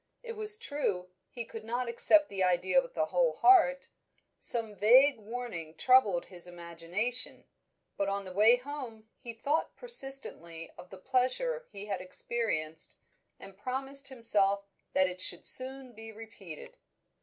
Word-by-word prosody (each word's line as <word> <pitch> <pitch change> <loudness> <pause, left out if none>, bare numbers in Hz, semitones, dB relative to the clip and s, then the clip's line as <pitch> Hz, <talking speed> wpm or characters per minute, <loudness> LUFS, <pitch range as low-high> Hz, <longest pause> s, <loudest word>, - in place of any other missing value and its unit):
It 475 - -7
was 430 -1 +3
true, 245 - -3 0.2
he 235 -2 -7
could 225 -1 -10
not 240 +2 -3
accept 300 +6 +5
the 195 -2 -2
idea 180 - +2
with - - -13
a - - +2
whole - - +2
heart; 325 -8 +4 0.5
some 225 -3 +2
vague 250 +7 +5
warning 210 -8 -7
troubled 235 -9 +3
his 180 -1 -8
imagination; 175 +8 -5 0.5
but 200 0 -1
on 200 0 -3
the 185 - -8
way 215 +5 +5
home 250 -4 -8
he 240 - -8
thought 280 +8 -2
persistently 270 - -1
of 180 - -13
the 190 - -11
pleasure 265 - -1
he 200 0 -9
had 195 -3 -4
experienced, 170 -5 -3 0.4
and 195 0 -13
promised 270 +4 -2
himself 200 -6 +1 0.3
that 190 0 +3
it 180 0 -6
should 175 - -4
be - - -6
soon 260 -1 +2 0.2
repeated. 210 -8 -11
230 Hz, 145 wpm, -30 LUFS, 190-270 Hz, 0.5 s, accept